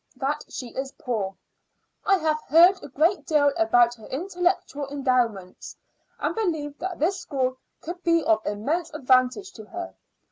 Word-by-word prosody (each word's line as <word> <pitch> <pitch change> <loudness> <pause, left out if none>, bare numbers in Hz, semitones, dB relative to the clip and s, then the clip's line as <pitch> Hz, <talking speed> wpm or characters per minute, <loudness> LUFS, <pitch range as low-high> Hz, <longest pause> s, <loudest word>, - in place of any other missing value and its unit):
that 285 +3 -2
she 250 - -6
is 265 +3 -5
poor. 205 -6 -3 0.7
I 390 - +5
have 310 -2 0
heard 350 +6 +6
a - - -8
great 325 +9 +2
deal 290 -2 +3
about 245 -9 +4
her 225 -3 -14
intellectual 350 -2 -1
endowments, 250 -9 -1 0.4
and - - -1
believe 315 -9 -2
that 365 -1 -4
this 370 +6 0
school 260 -6 -2 0.2
could 350 +2 -7
be 335 -1 +3
of 220 0 +2
immense 305 +12 -2
advantage 260 +8 +2
to 220 - -11
her. 345 +8 -7
290 Hz, 150 wpm, -25 LUFS, 255-345 Hz, 0.7 s, heard